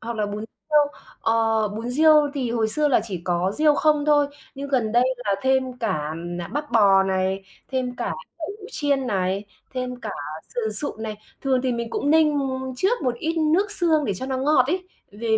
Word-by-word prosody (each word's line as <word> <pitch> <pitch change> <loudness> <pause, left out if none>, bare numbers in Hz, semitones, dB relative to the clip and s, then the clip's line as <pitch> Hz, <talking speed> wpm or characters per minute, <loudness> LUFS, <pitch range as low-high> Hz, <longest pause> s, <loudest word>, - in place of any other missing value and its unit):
hoặc 230 0 -5
là 210 - 0
bún 205 0 -4
riêu, 300 +7 -1 0.4
ờ, 225 -1 +2
bún 225 +4 -5
riêu 300 +1 +5
thì 255 -4 -1
hồi 225 -2 +1
xưa 295 +7 +1
là 270 - +4
chỉ 190 -6 -5
có 180 +2 0
riêu 300 -1 +4
không 300 -1 +3
thôi, 295 -1 +4 0.3
nhưng 280 +1 -6
gần 245 -6 +1
đây 240 +1 +5 0.2
là 200 - +2
thêm 260 -1 +1
cả, 155 -10 -2 0.3
à, 170 - -5
bắp 295 +1 -4
bò 200 -4 +6
này, 190 0 -1 0.2
thêm 255 -2 -2
cả - - -2 0.2
đậu 315 - -4
hũ 400 - -10
chiên 280 - 0
này, 195 -2 0 0.3
thêm 255 -1 -3
cả 220 -2 -5 0.4
sườn 220 -3 -1
sụn 220 0 -4
này. 215 -1 -4 0.2
Thường 265 -2 +1
thì 260 -1 +1
mình 235 -1 -3
cũng 285 - 0
ninh 305 -2 +4 0.4
trước 390 - +1
một 250 -3 +1
ít 320 +7 -3
nước 330 +7 +2
xương 330 -6 +2
để 200 - -1
cho 260 +8 -5
nó 265 -1 -1
ngọt 265 -1 +3
ấy, 365 +5 -2 0.2
về 225 +3 -5
250 Hz, 205 wpm, -23 LUFS, 215-295 Hz, 0.4 s, bò